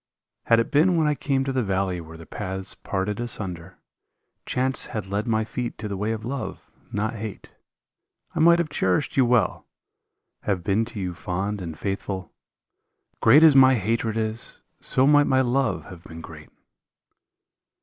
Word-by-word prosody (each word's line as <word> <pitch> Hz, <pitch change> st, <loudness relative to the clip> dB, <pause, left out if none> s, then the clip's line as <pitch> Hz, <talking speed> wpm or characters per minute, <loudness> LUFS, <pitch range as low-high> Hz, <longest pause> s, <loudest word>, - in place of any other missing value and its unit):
Had 115 Hz, -, +5 dB
it 115 Hz, -, -1 dB
been 170 Hz, +4 st, +4 dB
when 160 Hz, -, +3 dB
I 150 Hz, -, +3 dB
came 135 Hz, -1 st, 0 dB
to 135 Hz, -, -2 dB
the 130 Hz, -, +1 dB
valley 95 Hz, -4 st, -1 dB
where 80 Hz, 0 st, -11 dB
the 80 Hz, -, -11 dB
paths 95 Hz, 0 st, -5 dB
parted 100 Hz, +2 st, -3 dB
asunder, 95 Hz, -7 st, -5 dB, 0.7 s
Chance 130 Hz, +1 st, 0 dB
had 105 Hz, -4 st, -4 dB
led 100 Hz, +4 st, -2 dB
my 110 Hz, -1 st, +1 dB
feet 120 Hz, +2 st, -4 dB
to 105 Hz, -, -5 dB
the 100 Hz, -, -4 dB
way 105 Hz, +3 st, -1 dB
of 110 Hz, -1 st, -4 dB
love, 135 Hz, +2 st, -5 dB, 0.2 s
not 105 Hz, +2 st, -1 dB
hate, 110 Hz, -2 st, -7 dB, 0.8 s
I -, -, -3 dB
might 170 Hz, +2 st, +6 dB
have 170 Hz, -3 st, -1 dB
cherished 95 Hz, -2 st, 0 dB
you 130 Hz, -, +4 dB
well, 120 Hz, -2 st, +1 dB, 0.7 s
have 95 Hz, -4 st, -1 dB
been 105 Hz, +4 st, +1 dB
to 115 Hz, -2 st, -8 dB
you 90 Hz, -2 st, -3 dB
fond 95 Hz, +4 st, -3 dB
and 80 Hz, -3 st, -6 dB
faithful. 95 Hz, -2 st, -4 dB, 0.9 s
Great 140 Hz, +8 st, +7 dB
as 155 Hz, -3 st, +7 dB
my 130 Hz, -1 st, +7 dB
hatred 115 Hz, +1 st, -1 dB
is, 110 Hz, +1 st, -4 dB, 0.2 s
so 130 Hz, -, +1 dB
might 145 Hz, 0 st, +5 dB
my 130 Hz, 0 st, +3 dB
love 120 Hz, -, 0 dB
have 85 Hz, 0 st, -11 dB
been 80 Hz, -1 st, -10 dB
great. -, -, -11 dB
110 Hz, 170 wpm, -24 LUFS, 95-130 Hz, 0.9 s, Great